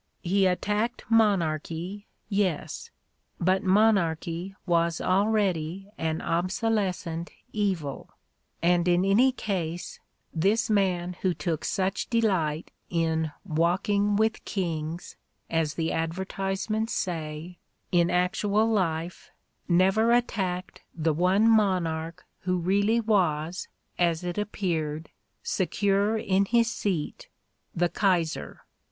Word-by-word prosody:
He 190 +2 +3
attacked 210 +6 -1
monarchy, 185 -2 +1 0.2
yes; 195 -6 -1 0.5
but 185 +2 +2
monarchy 190 -3 +2
was 170 -2 +1
already 195 -2 0
an 160 0 -2
obsolescent 180 -2 -1 0.2
evil, 185 -10 -2 0.5
and 175 0 +3
in 175 +1 +3
any 230 +7 +5
case 180 -8 -4 0.3
this 200 +7 +1
man 180 -3 +1
who 185 -2 +1
took 165 -4 -2
such 190 0 -1
delight 185 -10 0 0.2
in 160 -2 0
"walking 195 +5 +1
with 220 +1 +1
kings," 165 -3 -4 0.3
as 160 -2 0
the 165 -1 -1
advertise 190 +4 -2
ments 220 +1 -1
say, 165 0 -4 0.3
in 175 -1 +3
actual 200 +4 +2
life, 175 -5 -1 0.4
never 190 +6 +4
attacked 185 -7 -1
the 160 -1 +1
one 185 +7 +3
monarch 180 -6 +1
who 180 0 -1
really 200 +6 +2
was, 180 -6 0 0.3
as 170 -1 +2
it 175 +2 -3
appeared, 165 -7 -2 0.3
secure 200 +3 +1
in 195 -2 +2
his 230 +2 +2
seat, 200 - -3 0.5
the 175 0 +2
Kaiser. 170 - 0
185 Hz, 105 wpm, -27 LUFS, 165-205 Hz, 0.5 s, any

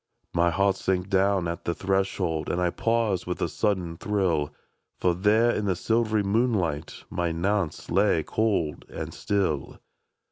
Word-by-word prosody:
My 85 0 +3
heart 100 +2 +2
sank 95 0 -1
down 95 -2 +2
at 85 0 -4
the 85 - -1
threshold. 95 -4 -1
And 85 - 0
I 90 -1 +1
paused 115 -5 0
with 90 - -3
a - - +1
sudden 90 -6 -1
thrill, 90 -8 0 0.5
For 90 - +2
there 105 +6 +3
in 105 - -1
the 95 -2 +1
silv'ry 110 +3 +1
moonlight 100 - 0
My 85 -1 -1
Nance 95 0 -1
lay, 95 -3 +3
cold 100 -9 0
and - - -6
still. 95 -9 -1
95 Hz, 150 wpm, -26 LUFS, 85-105 Hz, 0.5 s, My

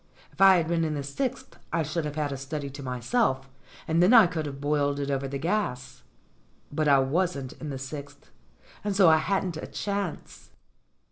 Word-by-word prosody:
If - - -10
I 195 -1 +8
had 165 -2 0
been 165 0 +1
in 155 -1 -1
the 145 - -3
sixth 260 - -4
I 165 -1 +1
should 155 +2 -3
have 150 -1 -4
had 150 -2 -1
a - - -3
study 140 +1 -5
to 140 +1 -9
myself, 130 - 0 0.4
and 165 +2 +2
then 195 +8 +6
I 225 -4 +9
could 160 -3 -3
have 140 -1 -7
boiled 145 0 0
it 140 0 -2
over 135 0 -1
the 140 +1 -4
gas. 130 -7 -2 0.7
But 155 +1 0
I 140 -1 +6
wasn't 140 0 0
in 155 - -5
the 135 - -4
sixth, 140 +2 -9 0.5
and 205 -1 -1
so 190 -4 +6
I 160 - +6
hadn't 185 0 -1
a - - -6
chance. 200 -4 -5
150 Hz, 200 wpm, -27 LUFS, 140-180 Hz, 0.7 s, I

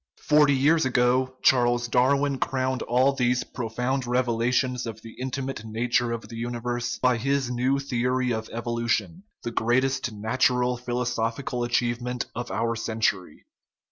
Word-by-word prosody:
Forty 150 -2 +5
years 155 +5 +3
ago 130 0 +2
Charles 120 -1 +3
Darwin 135 +3 +2
crowned 130 -1 -1
all 130 +3 +2
these 125 -1 +1
profound 125 +2 -3
revelations 125 +1 0
of 115 - -7
the 115 - -9
intimate 130 -2 -4
nature 115 +2 0
of 115 -1 -5
the 115 - -9
universe 120 +1 -3
by 125 -1 +2
his 135 +1 0
new 125 +3 +1
theory 125 -1 0
of 110 0 -4
evolution, 120 - -2 0.2
the 120 - -3
greatest 130 +3 +1
natural 125 +3 +1
philosophical 120 0 -2
achieve 120 0 0
ment 125 0 -3
of 120 - -5
our 115 0 -1
century. 110 -7 -2
125 Hz, 140 wpm, -25 LUFS, 120-130 Hz, 0.2 s, Forty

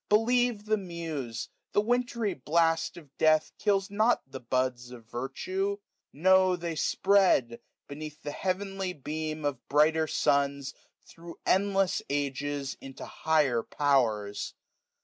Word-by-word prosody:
580 210 - +7 0.3
Believe 210 -3 -9
the 215 0 +2
Muse; 165 - -5 0.2
the 205 - +4
wintry 235 -2 0
blast 165 +4 +1
of 145 -5 -14
death 155 0 +4
Kills 200 -1 +1
not 215 +4 +2
the 135 0 -8
buds 125 0 -1
of 120 -2 -11
virtue; 185 - -3 0.3
no, 185 +3 +4
they 170 -1 -4
spread. 180 -9 +3 0.3
Beneath 150 +1 -8
the 145 - -4
heavenly 190 +1 -2
beam 155 0 -4
of 135 -4 -3
brighter 155 +2 +3
suns. 140 -1 +1 0.3
Thro' 170 0 -11
endless 195 0 +2
ages, 140 0 -2
into 135 -1 -9
higher 150 -7 +1
powers. 115 -8 0
155 Hz, 125 wpm, -29 LUFS, 135-190 Hz, 0.3 s, 580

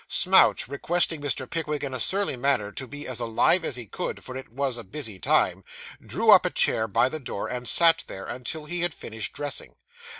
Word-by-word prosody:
Smouch, - - +5
requesting 160 +3 -1
Mr. 145 -2 -3
Pickwick 150 -1 -4
in 135 -2 -4
a 130 - -4
surly 195 - 0
manner 125 -5 0
'to 130 +4 -7
be 145 +3 -8
as 125 -2 -3
alive 120 +9 +2
as 145 - -2
he 120 -2 -6
could, - - -6
for 130 - -9
it 130 -4 -9
was 135 0 -2
a 120 - -8
busy 110 -2 -7
time,' - - +1 0.4
drew - - +2
up - - +8
a - - 0
chair 110 - +1
by 110 +4 +2
the 155 +4 -5
door 120 -7 -5
and 125 -1 -4
sat 165 +6 +6
there, 95 0 -8
until 130 +6 -6
he 175 +3 -1
had 175 -3 0
finished 110 -2 -6
dressing. 145 -1 -4
130 Hz, 210 wpm, -25 LUFS, 120-150 Hz, 0.4 s, up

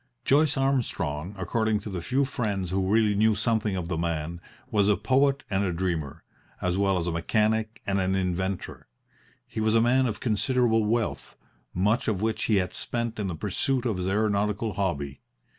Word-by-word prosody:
Joyce 145 +1 +3
Armstrong, 100 - -1
according 110 +3 0
to 105 - -7
the 90 -2 -3
few 130 +9 +1
friends 100 -9 -2
who 95 0 0
really 110 -1 +4
knew 110 +1 +3
something 110 -1 0
of 90 -3 -3
the 85 -2 -2
man, 85 0 -2 0.3
was 105 -1 +3
a 105 - +4
poet 135 +6 +2
and 100 -2 0
a 95 - 0
dreamer, 80 -4 -3 0.4
as 90 -1 0
well 95 -1 +2
as 85 - -1
a 90 - -1
mechanic 110 +6 0
and 100 0 0
an 95 +1 +1
inventor. 95 0 -2 0.6
He - - -6
was 110 +1 +2
a - - +6
man 125 +3 +3
of 105 -3 -3
considerable 115 0 +2
wealth, 115 +1 -2 0.3
much 105 - +1
of 105 -4 0
which 110 0 0
he 110 - +2
had 90 -2 0
spent 115 -2 -3
in 100 - -1
the 90 - -3
pursuit 120 - -1
of 110 -6 0
his 90 0 -2
aeronautical 105 +1 0
hobby. 75 -8 -2
105 Hz, 185 wpm, -27 LUFS, 90-115 Hz, 0.6 s, a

